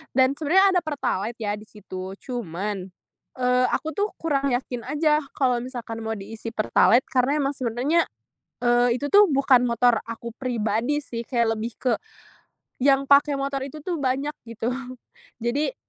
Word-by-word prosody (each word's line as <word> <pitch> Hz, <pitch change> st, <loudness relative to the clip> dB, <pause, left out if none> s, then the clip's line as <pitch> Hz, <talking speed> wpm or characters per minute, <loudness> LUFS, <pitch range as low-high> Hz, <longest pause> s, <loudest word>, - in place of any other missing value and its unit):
Dan 265 Hz, +1 st, +4 dB
sebenernya 375 Hz, +5 st, +4 dB
ada -, -, +5 dB
pertalite 235 Hz, -7 st, -2 dB
ya 205 Hz, -1 st, -1 dB
di 210 Hz, -, -11 dB
situ 190 Hz, -3 st, -8 dB
cuman, 200 Hz, -5 st, -4 dB, 0.5 s
eee, 250 Hz, 0 st, +2 dB
aku 315 Hz, -, -1 dB
tuh 415 Hz, +1 st, +1 dB
kurang 280 Hz, -4 st, 0 dB
yakin 245 Hz, -1 st, -3 dB
aja 300 Hz, 0 st, +1 dB
kalau 255 Hz, -3 st, +2 dB
misalkan 230 Hz, -3 st, -6 dB
mau 220 Hz, -, -2 dB
diisi 225 Hz, +3 st, -7 dB
pertalite 235 Hz, +3 st, +4 dB
karena 270 Hz, +4 st, +2 dB
emang 275 Hz, 0 st, -1 dB
sebenernya, 260 Hz, +7 st, +1 dB, 0.6 s
eee, 240 Hz, 0 st, +3 dB
itu 285 Hz, +3 st, -3 dB
tuh 410 Hz, +1 st, +7 dB
bukan 270 Hz, -4 st, +4 dB
motor 235 Hz, 0 st, +3 dB
aku 230 Hz, +1 st, -6 dB
pribadi 240 Hz, +3 st, -1 dB
sih, 235 Hz, -4 st, -6 dB
kayak 230 Hz, -3 st, +1 dB
lebih 225 Hz, +1 st, -4 dB
ke 250 Hz, -3 st, +2 dB, 0.9 s
yang 275 Hz, +1 st, +3 dB
pakai 285 Hz, +1 st, +6 dB
motor 275 Hz, 0 st, -2 dB
itu 300 Hz, +2 st, -9 dB
tuh 345 Hz, -2 st, -3 dB
banyak 275 Hz, +2 st, 0 dB, 0.2 s
gitu 230 Hz, +1 st, -3 dB, 0.7 s
jadi 285 Hz, -, 0 dB
250 Hz, 155 wpm, -24 LUFS, 230-285 Hz, 0.9 s, tuh